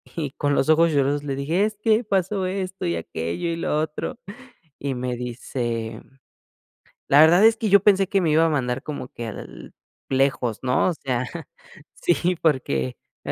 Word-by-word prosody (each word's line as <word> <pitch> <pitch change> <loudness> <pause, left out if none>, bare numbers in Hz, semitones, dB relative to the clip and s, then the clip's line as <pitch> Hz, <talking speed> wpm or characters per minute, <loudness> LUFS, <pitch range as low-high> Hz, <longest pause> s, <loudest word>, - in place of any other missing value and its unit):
y 150 -5 -3
con 145 0 -1
los 140 - +1
ojos 165 +1 +5
lloros 145 0 +1
le 140 -2 -3
dije: 165 +9 +1
"Es 215 -1 -3
que 220 +2 +2
pasó 195 -1 0
esto 190 0 -4
y 85 0 0
aquello, 85 - -4
y 165 - -1
lo 165 - -2
otro", 155 +9 -4 0.6
y 140 -1 -3
me 125 0 -3
dice: 120 -2 -4 1.1
"La 145 +2 +6
verdad 175 +6 +6
es 225 0 +6
que 220 -2 -2
yo 200 0 +6
pensé 195 -2 +4
que 200 -3 +2
me 165 -3 +1
iba 160 +2 +4
a - - +2
mandar 130 -4 -1
como 140 -4 -6
que 120 - -7
al 110 - -9 0.3
lejos, 130 -4 0
¿no? 125 +7 +2
O - - -3
sea, 130 -3 -2 0.7
sí, 175 +1 +1
porque 70 - 0 0.3
me - - -5
145 Hz, 180 wpm, -23 LUFS, 125-185 Hz, 1.1 s, La